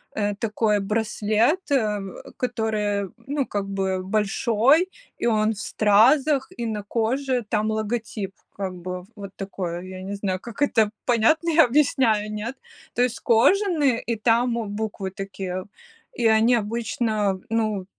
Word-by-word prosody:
э, 205 Hz, -1 st, 0 dB
такой 210 Hz, 0 st, 0 dB
браслет, 220 Hz, -, +1 dB
э, 215 Hz, -7 st, +2 dB, 0.4 s
который, 220 Hz, -4 st, -1 dB
м, 190 Hz, -, -9 dB
ну, 280 Hz, -1 st, 0 dB
как 205 Hz, -4 st, -3 dB
бы 190 Hz, -1 st, -1 dB
большой, 225 Hz, -, +2 dB, 0.3 s
и -, -, 0 dB
он 215 Hz, -1 st, +2 dB
в 205 Hz, -, -10 dB
стразах, 265 Hz, +9 st, +3 dB
и 235 Hz, -, -2 dB
на 215 Hz, -2 st, -2 dB
коже 245 Hz, +3 st, -1 dB
там 215 Hz, 0 st, 0 dB
логотип, 215 Hz, -2 st, -3 dB, 0.2 s
как 190 Hz, -2 st, -3 dB
бы 180 Hz, 0 st, -6 dB
вот 200 Hz, -2 st, -8 dB
такое, 185 Hz, -3 st, -4 dB
я 185 Hz, 0 st, -8 dB
не 195 Hz, +2 st, -5 dB
знаю, 190 Hz, -2 st, -2 dB
как 235 Hz, +7 st, -4 dB
это 225 Hz, -7 st, +3 dB, 0.2 s
понятно 285 Hz, +8 st, +3 dB
я 325 Hz, 0 st, +6 dB
объясняю, 235 Hz, -5 st, +2 dB
нет? 220 Hz, +5 st, -4 dB, 0.4 s
То 245 Hz, -, +3 dB
есть 245 Hz, -2 st, -1 dB
кожаный, 290 Hz, -, +3 dB
и 235 Hz, -, -2 dB
там 230 Hz, +2 st, +2 dB, 0.2 s
буквы 205 Hz, -3 st, -4 dB
такие, 190 Hz, -2 st, -5 dB, 0.5 s
и 240 Hz, -, -1 dB
они 220 Hz, +2 st, +4 dB
обычно, 215 Hz, -2 st, -1 dB
ну, 215 Hz, -4 st, 0 dB
220 Hz, 145 wpm, -24 LUFS, 200-240 Hz, 0.5 s, я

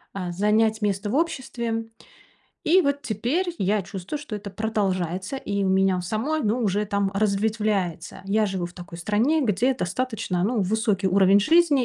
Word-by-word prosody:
э, 180 Hz, -3 st, -3 dB
занять 215 Hz, +4 st, +2 dB
место 205 Hz, 0 st, -1 dB
в -, -, -1 dB
обществе. 240 Hz, -8 st, -1 dB, 0.8 s
И 360 Hz, +4 st, +5 dB
вот 280 Hz, 0 st, 0 dB
теперь 270 Hz, -, -1 dB
я 200 Hz, +2 st, +1 dB
чувствую, 190 Hz, +8 st, -6 dB
что 290 Hz, -6 st, -7 dB
это 205 Hz, 0 st, -7 dB
продолжается 190 Hz, -1 st, -2 dB
и 200 Hz, -6 st, -2 dB
у -, -, +1 dB
меня 190 Hz, -1 st, +3 dB
у -, -, -2 dB
самой, 225 Hz, -, -1 dB
ну, 215 Hz, +3 st, +1 dB
уже 205 Hz, -1 st, +1 dB
там 200 Hz, -1 st, 0 dB
разветвляется. 205 Hz, -4 st, -1 dB
Я 210 Hz, +2 st, +2 dB
живу 190 Hz, -3 st, -2 dB
в 175 Hz, -, -12 dB
такой 175 Hz, -1 st, -10 dB
стране, 220 Hz, -, +1 dB
где 230 Hz, +4 st, +2 dB
достаточно, 220 Hz, -4 st, -2 dB
ну, 225 Hz, +1 st, +1 dB
высокий 210 Hz, 0 st, 0 dB
уровень 195 Hz, +1 st, +5 dB
жизни, 310 Hz, +1 st, +4 dB
210 Hz, 165 wpm, -24 LUFS, 190-235 Hz, 0.8 s, И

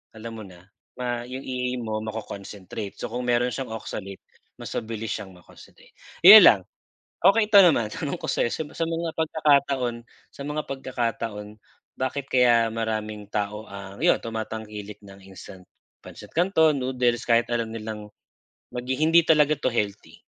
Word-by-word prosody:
alam 115 Hz, +1 st, -8 dB
mo 110 Hz, -, -8 dB
na 90 Hz, 0 st, -17 dB, 0.6 s
yung 130 Hz, +2 st, -7 dB
EA 125 Hz, -1 st, -3 dB
mo 110 Hz, -1 st, -3 dB
ma-co-concentrate 105 Hz, -1 st, -7 dB
so -, -, -6 dB
kung 125 Hz, +1 st, -4 dB
meron 120 Hz, 0 st, +2 dB
siyang 130 Hz, -4 st, -5 dB
oxalate 100 Hz, -3 st, -7 dB, 0.3 s
mas -, -, -9 dB
mabilis 115 Hz, 0 st, -5 dB
siyang 95 Hz, -2 st, -6 dB
ma-concentrate, 90 Hz, -, -18 dB, 0.3 s
'yon -, -, +13 dB
lang. -, -, +6 dB, 0.7 s
Okey 210 Hz, +1 st, +4 dB
ito 205 Hz, -, +9 dB
naman 140 Hz, -11 st, +4 dB
tanong 140 Hz, +3 st, -4 dB
ko -, -, -5 dB
sa -, -, +1 dB
sa -, -, -3 dB
sa 165 Hz, -, -2 dB
mga 165 Hz, 0 st, -2 dB
pagkakataon 140 Hz, -6 st, +1 dB, 0.4 s
sa -, -, -12 dB
mga 150 Hz, +1 st, -3 dB
pagkakataon 115 Hz, -5 st, -4 dB, 0.4 s
bakit 130 Hz, +1 st, -3 dB
kaya 120 Hz, -2 st, +4 dB
maraming 110 Hz, -2 st, -4 dB
tao 105 Hz, +1 st, -3 dB
ang 100 Hz, 0 st, -10 dB
iyon -, -, +5 dB
tumatangkilik 110 Hz, -2 st, -6 dB
ng 100 Hz, -1 st, -14 dB
instant 95 Hz, 0 st, -12 dB, 0.4 s
Pansit -, -, -12 dB
Canton 160 Hz, -4 st, +3 dB
noodles 125 Hz, -2 st, 0 dB
kahit 115 Hz, 0 st, +3 dB
alam 115 Hz, -1 st, 0 dB
nilang 110 Hz, -1 st, -6 dB, 0.7 s
maghi 125 Hz, +2 st, -3 dB
hindi 165 Hz, +2 st, +5 dB
talaga 155 Hz, -1 st, +4 dB
to -, -, -1 dB
healthy? 100 Hz, -7 st, -4 dB
115 Hz, 150 wpm, -25 LUFS, 105-135 Hz, 0.7 s, yon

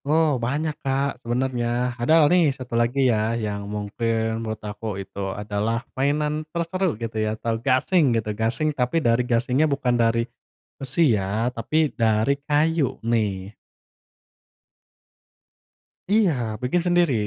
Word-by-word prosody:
Oh 150 Hz, -3 st, +2 dB
banyak, 150 Hz, +6 st, -1 dB
Kak, 135 Hz, -2 st, -1 dB
sebenarnya. 120 Hz, 0 st, -1 dB
Padahal 150 Hz, +6 st, +4 dB
nih, 175 Hz, -4 st, +5 dB
satu 125 Hz, -2 st, -9 dB
lagi 120 Hz, +4 st, +2 dB
ya 110 Hz, +2 st, 0 dB
yang 100 Hz, -2 st, -4 dB
mungkin 110 Hz, +2 st, -2 dB
menurut 110 Hz, -1 st, -4 dB
aku 105 Hz, -1 st, -5 dB
itu 100 Hz, 0 st, -5 dB
adalah 105 Hz, +4 st, -2 dB
mainan 150 Hz, +3 st, 0 dB
terseru 170 Hz, -, -1 dB
gitu 110 Hz, -1 st, -3 dB
ya 110 Hz, 0 st, -1 dB
atau 115 Hz, 0 st, -2 dB
gasing 130 Hz, +1 st, +2 dB
gitu. 110 Hz, -1 st, -2 dB
Gasing, 115 Hz, +8 st, 0 dB
tapi 125 Hz, +3 st, 0 dB
dari 115 Hz, +1 st, +4 dB
gasingnya 125 Hz, +6 st, +2 dB
bukan 135 Hz, -3 st, 0 dB
dari 115 Hz, 0 st, +2 dB, 0.5 s
besi 135 Hz, 0 st, +2 dB
ya 105 Hz, +4 st, -1 dB
tapi 155 Hz, +6 st, 0 dB
dari 110 Hz, +3 st, +2 dB
kayu 150 Hz, -1 st, +1 dB
nih. 105 Hz, -4 st, -1 dB, 2.5 s
Iya 210 Hz, -3 st, +4 dB, 0.3 s
bikin 150 Hz, +8 st, +1 dB
sendiri 175 Hz, -4 st, +3 dB
120 Hz, 130 wpm, -23 LUFS, 110-145 Hz, 2.5 s, nih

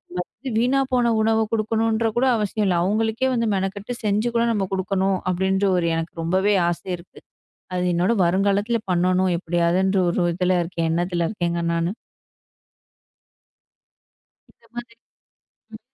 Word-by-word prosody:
First 215 Hz, +8 st, -6 dB
வீணா 255 Hz, +4 st, +2 dB
போன 240 Hz, -2 st, +3 dB
உணவ 220 Hz, 0 st, +2 dB
கொடுக்கணுன்ற 225 Hz, +1 st, +1 dB
கூட 255 Hz, -, +3 dB
அவசியம் 210 Hz, 0 st, -1 dB
இல்ல. 180 Hz, -, +2 dB
அவுங்களுக்கே 220 Hz, +5 st, 0 dB
வந்து 230 Hz, -1 st, 0 dB
மெனக்கெட்டு 200 Hz, +5 st, -3 dB
செஞ்சு 210 Hz, +3 st, +1 dB
கூட 235 Hz, 0 st, +3 dB
நம்ம 200 Hz, -4 st, -1 dB
கொடுக்கணும் 190 Hz, 0 st, 0 dB
அப்பிடின்டு 190 Hz, +2 st, +1 dB
ஒரு 170 Hz, -1 st, 0 dB
எனக்கு 165 Hz, +1 st, -4 dB
ரொம்பவே 190 Hz, +5 st, +2 dB, 0.2 s
ஆசை 175 Hz, +2 st, -5 dB
இருக்கு. 170 Hz, +1 st, -16 dB, 0.6 s
அது 180 Hz, 0 st, 0 dB
என்னோட 180 Hz, +6 st, +2 dB
வருங்காலத்தில 200 Hz, +5 st, +1 dB
பண்ணனும். 180 Hz, +1 st, +2 dB
எப்பிடியாவதுன்ற 175 Hz, +3 st, +1 dB
ஒரு 175 Hz, 0 st, 0 dB
இதுல 180 Hz, 0 st, +1 dB
இருக்கேன். 165 Hz, -1 st, -2 dB
எண்ணத்துல 175 Hz, 0 st, 0 dB
இருக்கேங்க 170 Hz, -4 st, -2 dB
நானு. 170 Hz, +3 st, -1 dB, 2.6 s
இந்த 230 Hz, -, -29 dB
மாதிரி, 240 Hz, -1 st, -8 dB, 0.8 s
ம். 220 Hz, -, -8 dB
195 Hz, 130 wpm, -22 LUFS, 180-220 Hz, 2.6 s, போன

